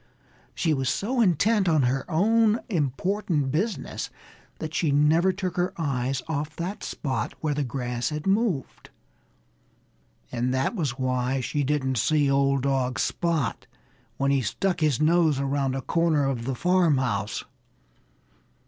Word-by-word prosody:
She 160 -3 +1
was 135 -2 0
so 240 +5 0
intent 200 +1 +3
on 155 -4 +3
her 135 +5 -1
own 220 +6 +3
important 160 - 0
business 175 - -2 0.5
that 155 0 -6
she 150 -1 +1
never 155 +6 +4
took 185 -1 -4
her 180 +1 0
eyes 135 -4 -1
off 155 0 -3
that 180 +5 -5
spot 130 -4 -3
where 155 -2 0
the 145 0 -1
grass 125 -2 -3
had 150 0 -5
moved. 195 - -1 1.4
And 125 +1 -1
that 130 - 0
was 145 - -2
why 130 0 0
she 140 +4 -1
didn't 135 -3 0
see 145 +3 +2
old 140 -1 +2
dog 130 -2 0
Spot 165 -7 -1 0.5
when 140 0 +1
he 140 -1 +2
stuck 180 - -1
his 150 -6 +2
nose 160 -2 +3
around 135 -1 0
a 135 - -4
corner 165 -4 +2
of 125 -4 -2
the 135 0 -2
farmhouse. 130 - +1
145 Hz, 140 wpm, -26 LUFS, 130-175 Hz, 1.4 s, never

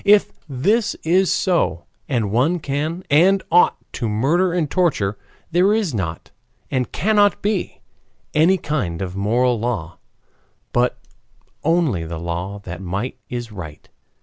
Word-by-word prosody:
If 205 0 +5 0.2
this 200 - +1
is 185 +3 +3
so, 170 - +1 0.2
and 115 -7 0
one 135 +11 +2
can 155 +4 -3
and 185 +6 +5
ought 175 +2 +5 0.2
to 115 - -2
murder 155 - +2
and 170 -3 0
torture, 140 - +1 0.4
there 185 +5 +4
is 205 - 0
not, 85 -6 -4 0.4
and 130 -3 -1
cannot 205 0 +2
be, 205 -3 -1 0.5
any 170 +5 +4
kind 100 - -2
of 90 0 -5
moral 120 +4 +1
law, 105 -8 -3 0.7
but 125 +1 +2 0.7
only 160 - +2
the 80 0 -5
law 85 +4 -4
that 85 -1 -7
might 100 +7 -4
is 120 -2 -5
right. 80 -7 -9
130 Hz, 135 wpm, -21 LUFS, -, 0.7 s, If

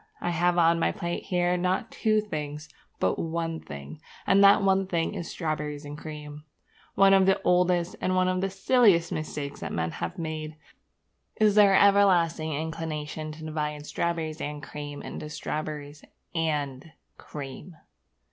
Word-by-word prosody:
I 175 - -1
have 175 +1 +2
on 170 0 +4
my - - +2
plate 170 0 -4
here, 180 -1 +1
not 185 +5 -1
two 215 -1 +2
things, 150 -6 -6 0.3
but - - +1
one 165 0 -2
thing; 70 - -9 0.2
and 195 +1 +5
that 200 0 +7
one 195 0 +2
thing 170 -3 -1
is 170 - -5
strawberriesandcream. 150 -1 -5 0.5
One 195 0 +6
of 190 -1 +5
the 190 - +4
oldest 180 -1 +2
and 185 - +1
one 185 0 +3
of 185 0 0
the 195 - 0
silliest 195 -3 +3
mistakes 150 -2 -4
that - - -5
men 80 0 -1
have 180 - -5
made 155 -2 -5 0.8
is 215 -1 +4
their 200 -2 +6
everlasting 180 -6 +4
inclination 155 0 -4
to 155 +1 -11
divide 150 -1 -3
strawberries 165 -1 -2
and 145 0 -5
cream 145 -1 -7
into 150 - -7
strawberries 150 -1 -5 0.3
and 150 -2 -2 0.3
cream. 145 +4 -8
165 Hz, 145 wpm, -27 LUFS, 150-185 Hz, 0.8 s, that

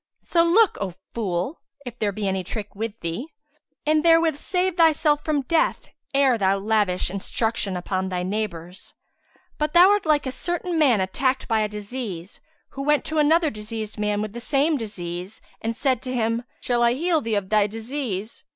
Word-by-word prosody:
So 335 -1 +2
look, 385 +5 +4
O 185 -3 -3 0.2
fool, 200 - -2 0.2
if 245 -1 -8
there 210 -2 +1
be 200 0 -3
any 190 -1 -1
trick 210 +2 -6
with 225 +1 -5
thee; 170 - -4 0.6
and 305 0 +3
therewith 330 -2 +5
save 365 +1 0
thyself 310 -3 +3
from 295 -3 0
death 320 +5 0 0.2
ere 275 -4 +3
thou 195 0 +2
lavish 200 -3 +1
instruction 200 0 -1
upon 185 +1 -2
thy 180 -1 -2
neighbours. 185 -3 -5 0.6
But 300 +1 -1
thou 355 +3 +8
art 410 -5 +1
like 300 -2 +3
a 260 - -2
certain 345 +4 -2
man 250 -10 +4
attacked 260 +8 0
by 220 -1 +2
a 210 - 0
disease, 205 -4 -6 0.3
who 275 - -7
went 295 +1 +2
to 315 0 -1
another 315 +1 +4
diseased 215 0 -6
with 210 0 -1
the 240 - -6
same 290 +5 +2
disease, 185 -4 -5 0.2
and 225 +1 -2
said 260 -2 +1
to 255 - -4
him, 230 0 0 0.2
'Shall 240 -1 0
I 235 0 +4
heal 325 +3 +1
thee 225 -4 -1
of 195 -2 -2
thy 210 -1 +3
disease?' 225 -2 -5
230 Hz, 180 wpm, -24 LUFS, 200-295 Hz, 0.6 s, thou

